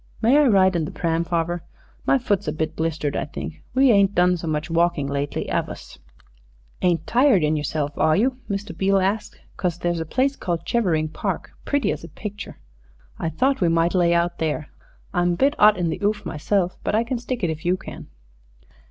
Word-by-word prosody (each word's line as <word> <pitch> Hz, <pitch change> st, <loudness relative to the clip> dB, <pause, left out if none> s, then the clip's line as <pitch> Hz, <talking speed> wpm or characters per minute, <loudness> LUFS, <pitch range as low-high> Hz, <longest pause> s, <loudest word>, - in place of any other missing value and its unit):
"May 235 Hz, +4 st, +4 dB
I 295 Hz, -, +5 dB
ride 190 Hz, -4 st, +4 dB
in 165 Hz, -2 st, 0 dB
the -, -, -5 dB
pram, 165 Hz, 0 st, 0 dB
farver? 170 Hz, 0 st, -1 dB, 0.5 s
My -, -, +5 dB
foot's 205 Hz, -9 st, -1 dB
a -, -, +1 dB
bit 155 Hz, +1 st, -3 dB
blistered, 160 Hz, -2 st, -2 dB
I -, -, -1 dB
think. 155 Hz, +2 st, -7 dB
We 265 Hz, -1 st, +5 dB
ain't 200 Hz, -2 st, +4 dB
done 180 Hz, +1 st, +4 dB
so 170 Hz, -1 st, -6 dB
much 155 Hz, 0 st, -1 dB
walkin' 170 Hz, -3 st, +1 dB
lately, 140 Hz, +1 st, -3 dB
'ave -, -, -1 dB
us?" -, -, -11 dB, 0.8 s
"Ain't 170 Hz, -3 st, +1 dB
tired 245 Hz, -, +4 dB
in 150 Hz, +1 st, +2 dB
yourself, 145 Hz, 0 st, -2 dB
are 155 Hz, 0 st, +4 dB
you?" 250 Hz, +4 st, +1 dB
Mr. 200 Hz, -3 st, -4 dB
Beale 195 Hz, +3 st, +2 dB
asked, 195 Hz, +3 st, -1 dB, 0.2 s
"'cause 175 Hz, -3 st, -1 dB
there's 175 Hz, -1 st, -1 dB
a 165 Hz, -, -3 dB
place 270 Hz, -, +1 dB
called 170 Hz, -7 st, -3 dB
Chevering 170 Hz, -10 st, +1 dB
Park, -, -, -4 dB
pretty 285 Hz, -1 st, +1 dB
as -, -, -5 dB
a -, -, -7 dB
picture 205 Hz, -1 st, -8 dB, 0.6 s
I -, -, -1 dB
thought 265 Hz, -, +1 dB
we 175 Hz, -, +4 dB
might 165 Hz, +1 st, +2 dB
lay 175 Hz, -2 st, +3 dB
out 170 Hz, 0 st, +1 dB
there. 155 Hz, -1 st, -2 dB, 0.4 s
I'm 175 Hz, -1 st, +2 dB
a -, -, -1 dB
bit 275 Hz, +10 st, +3 dB
'ot 210 Hz, 0 st, +6 dB
in 175 Hz, -2 st, 0 dB
the 160 Hz, -, -4 dB
'oof 210 Hz, +1 st, 0 dB
meself; 180 Hz, +4 st, -1 dB
but -, -, 0 dB
I 225 Hz, -, +3 dB
can 245 Hz, +1 st, -3 dB
stick 245 Hz, -2 st, -4 dB
it 170 Hz, -, +1 dB
if 160 Hz, 0 st, -7 dB
you 180 Hz, +2 st, +1 dB
can." -, -, -10 dB
175 Hz, 210 wpm, -23 LUFS, 160-210 Hz, 0.8 s, ot